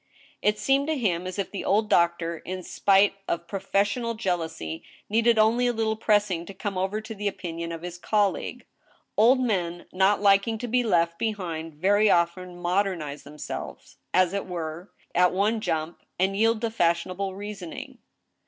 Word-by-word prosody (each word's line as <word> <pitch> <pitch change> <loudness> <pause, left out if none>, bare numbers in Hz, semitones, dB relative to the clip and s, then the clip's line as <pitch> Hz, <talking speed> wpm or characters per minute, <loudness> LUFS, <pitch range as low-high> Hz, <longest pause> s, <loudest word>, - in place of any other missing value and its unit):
It 210 0 +2
seemed 270 +7 +2
to 315 -1 0
him 185 -7 0
as 185 - -5
if 200 - -2
the 200 - -4
old 210 +2 +2
doctor, 170 -2 +2
in 185 0 -6
spite 195 +3 +3
of 170 0 -2
professional 200 +5 0
jealousy, 165 -5 -3 0.3
needed 230 +1 +4
only 230 +3 +4
a 245 - +1
little 220 -1 0
pressing 205 -5 +1
to 195 - -9
come 200 0 -4
over 195 +3 -1
to 225 +1 -7
the 205 -1 -3
opinion 170 -3 -4
ot 165 0 -6
his 175 0 -6
colleague. 205 0 0 0.5
Old 245 +5 +5
men, 175 -8 -1
not 190 +2 +3
liking 200 +2 +3
to 245 +2 -5
be 250 +2 +2
left 170 -7 +1
behind, 170 -8 -3
very 205 +6 +3
often 175 +1 +1
modernize 175 -5 -1
themselves, 150 +1 -8
as 185 0 +3
it 200 -1 -2
were, 170 0 -5 0.2
at 180 0 +4
one 210 +4 +1
jump, 160 -5 -2 0.2
and 190 +2 +1
yield 225 +1 +2
to 230 -1 -1
fashionable 185 0 0
rea 205 +2 -5
soning. 180 -5 -8
195 Hz, 170 wpm, -26 LUFS, 170-215 Hz, 0.5 s, Old